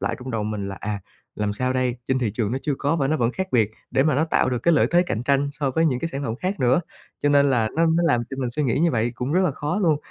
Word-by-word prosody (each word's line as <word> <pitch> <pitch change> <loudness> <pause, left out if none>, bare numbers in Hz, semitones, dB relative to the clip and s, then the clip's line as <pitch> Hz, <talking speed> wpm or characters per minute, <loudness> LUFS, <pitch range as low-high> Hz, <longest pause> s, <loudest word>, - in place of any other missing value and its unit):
lại 100 - -2
trong 125 +1 -7
đầu 110 -3 -2
mình 105 -2 -3
là 95 - -6
"À, 105 -1 -3 0.3
làm 105 -1 -1
sao 130 +5 -1
đây?" 130 -1 0
Trên 130 0 +2
thị 120 -4 0
trường 110 -2 -1
nó 130 - -1
chưa 145 -3 0
có, 145 +4 +1
và 135 -3 0
nó 155 - +2
vẫn 120 -3 0
khác 190 +5 -3
biệt 110 -4 +3 0.2
để 130 - +3
mà 155 +1 +2
nó 150 +4 +2
tạo 160 - +1
được 125 - 0
cái 170 +7 +3
lợi - - +4
thế 175 +1 +4
cạnh 120 -10 -3
tranh 140 +2 +1
so 140 -1 -1
với 160 +5 +1
những 130 -5 +1
cái 165 - -2
sản 140 -3 -4
phẩm 110 - -2
khác 185 +3 -3
nữa. 130 +5 +3 0.4
Cho 145 - +3
nên 140 -1 +4
là 115 -4 +2
nó 165 - +4
nó 165 +1 +2
làm 145 -8 +3
cho 135 - -5
mình 125 - -1
suy 150 +5 -2
nghĩ 125 -5 +1
như 170 +1 +3
vậy, 115 0 0
cũng 125 +4 -3
rất 185 - +3
là 180 - +2
khó 150 +7 -3
luôn. 165 -7 +3
135 Hz, 325 wpm, -23 LUFS, 120-155 Hz, 0.4 s, lợi